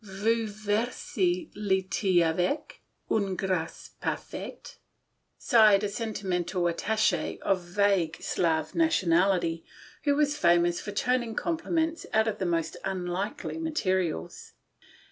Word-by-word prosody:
" - - -28
Vous 215 +3 0
versez 205 -3 -1
le 190 -2 0
th6 185 -2 +2
avec 180 - -1 0.3
une 200 -3 +1
gr&ce 185 -4 -3
par - - 0
faite," - - -9 0.6
sighed 215 -3 +5
a - - +1
sentimental 185 -5 -2
attache 215 +6 0
of 195 -1 +2
vague 180 -2 +1
Slav 160 -2 0
nationality, 180 - +2 0.4
who 285 -1 +3
was 295 0 +2
famous 175 -4 +3
for 205 - -6
turning 240 +2 0
out - - -14
compliments 330 -1 -1
from 220 -1 +2
the 190 - -1
most 165 -2 -1
unlikely 190 - -3
materials. 190 - -2
195 Hz, 120 wpm, -28 LUFS, 175-225 Hz, 0.6 s, sighed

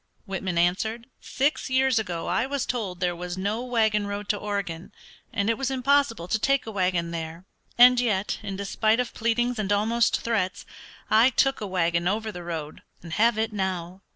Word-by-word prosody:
Whitman 190 -3 -3
answered, 220 +7 0
"Six 280 +2 -1
years 260 -2 +3
ago 175 -6 -4
I 245 - 0
was 280 -1 -2
told 200 -8 -3
there 175 -1 0
was 180 +1 -5
no 205 +5 -1
wagon 220 -4 +1
road 200 0 -5
to - - +3
Oregon, 200 -5 -4 0.4
and 200 - -1
it 230 -1 +1
was 270 -1 0
impossible 265 -7 +1
to 220 - 0
take 275 +3 +1
a 225 - -6
wagon 180 -4 0
there, 165 +1 -6 0.3
and 250 +1 +8
yet 210 -5 0
in 200 -2 -5
despite 215 +3 +1
of 250 -1 -2
pleadings 240 +1 0
and 205 -1 -1
almost 225 +3 +2
threats, 200 -5 -1 0.5
I 225 +4 +6
took 270 +1 +1
a 210 - -3
wagon 170 -2 0
over 215 +3 -1
the 180 - -8
road 165 -3 -6 0.2
and 165 -2 -8
have 230 +3 +3
it 220 0 -1
now." 185 -2 -3
210 Hz, 185 wpm, -26 LUFS, 180-235 Hz, 0.5 s, and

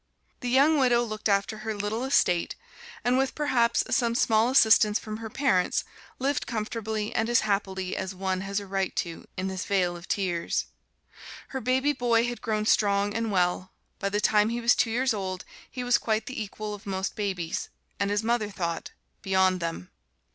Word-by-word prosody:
The 250 - -3
young 285 +5 +4
widow 245 -2 +4
looked 215 -2 -3
after 200 +2 +1
her 215 0 -4
little 205 +4 -2
estate, 180 -10 +2 0.5
and 250 +2 +2
with 270 0 0
perhaps 250 -6 +2
some 235 -2 +1
small 225 0 +3
assistance 220 -4 +5
from 215 0 -6
her 225 0 -7
parents, 210 -8 +1 0.3
lived 280 +2 -1
comfortably 220 -1 -3
and 225 +1 0
as 240 - +4
happily 190 -2 -1
as 190 0 -4
one 185 0 -2
has 195 +1 -2
a 200 - -8
right 195 -1 -2
to 170 -1 -4
in 185 - -2
this 190 -1 -3
vale 185 -3 +1
of 175 +1 -10
tears. 180 -4 -1 0.8
Her 265 - -4
baby 260 +4 +2
boy 240 -3 +2
had 240 0 -4
grown 215 -2 -1
strong 205 -1 +2
and 225 -1 -1
well: 185 0 0 0.3
by 200 - -1
the 205 +1 0
time 210 0 +3
he 235 +1 -2
was 235 +1 +4
two 245 - +1
years 250 +2 +1
old 190 -3 -4 0.2
he 250 - -5
was 245 0 +3
quite 220 -1 -1
the 255 -4 -5
equal 210 +1 -6
of 205 0 -10
most 190 0 -2
babies 185 -6 -3 0.3
and 200 0 +1
his 205 +1 0
mother 230 -2 0
thought, 170 -4 -4 0.3
beyond 190 -1 +2
them. 165 - -5
215 Hz, 185 wpm, -27 LUFS, 190-235 Hz, 0.8 s, assistance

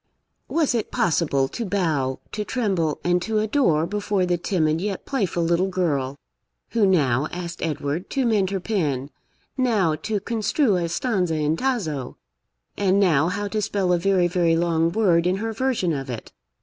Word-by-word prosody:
Was 315 -5 +1
it 230 -3 -1
possible 145 -5 +1
to 235 - -4
bow, 160 -10 0
to 210 - -3
tremble, 190 - -1
and 175 0 +2
to 220 +3 -1
adore, 210 - +2
before 205 0 -1
the 180 0 +1
timid, 165 -3 0
yet 200 -1 -3
playful 195 -10 -1
little 170 +3 +2
girl, 145 -8 -1 0.5
who 220 -3 +3
now 145 -6 +2
asked 175 -1 -6
Edward 155 +1 -2
to 270 -2 0
mend 210 -5 +2
her 195 -1 -2
pen, 150 - -2 0.5
now 215 -10 +2
to 205 +7 -2
construe 220 +1 +1
a 170 -1 -1
stanza 180 -3 0
in 155 0 +1
Tasso, 165 - -2 0.6
and 195 -1 +2
now 165 -6 +3
how 205 +3 -2
to 215 +1 -1
spell 195 -3 0
a 175 - +2
very 185 -1 +2
very 175 -2 +2
long 165 -1 +1
word 180 -4 +3
in 180 - +2
her 225 +3 -3
version 225 -8 0
of 135 -2 -4
it? 120 -3 -6
180 Hz, 170 wpm, -23 LUFS, 160-210 Hz, 0.6 s, who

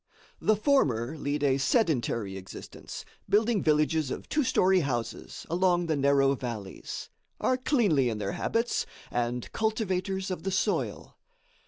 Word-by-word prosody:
The 215 - +4
former 160 - +2
lead 145 0 -2
a 135 -1 +3
sedentary 130 - +1
existence, 95 0 -9 0.2
building 215 0 +3
villages 155 -1 +2
of - - -5
two 300 - +2
story 190 -5 +4
houses 125 -7 -3
along 175 +1 +2
the 160 -2 0
narrow 140 -1 +4
valleys, 115 -7 -6 0.3
are 255 - +2
cleanly 220 - +2
in 110 - -2
their 100 -2 -2
habits, 230 +1 0 0.2
and 120 0 -2
cultivators 195 -3 -1
of 180 - -3
the 195 - -2
soil. 190 - -1
155 Hz, 135 wpm, -28 LUFS, 125-200 Hz, 0.3 s, The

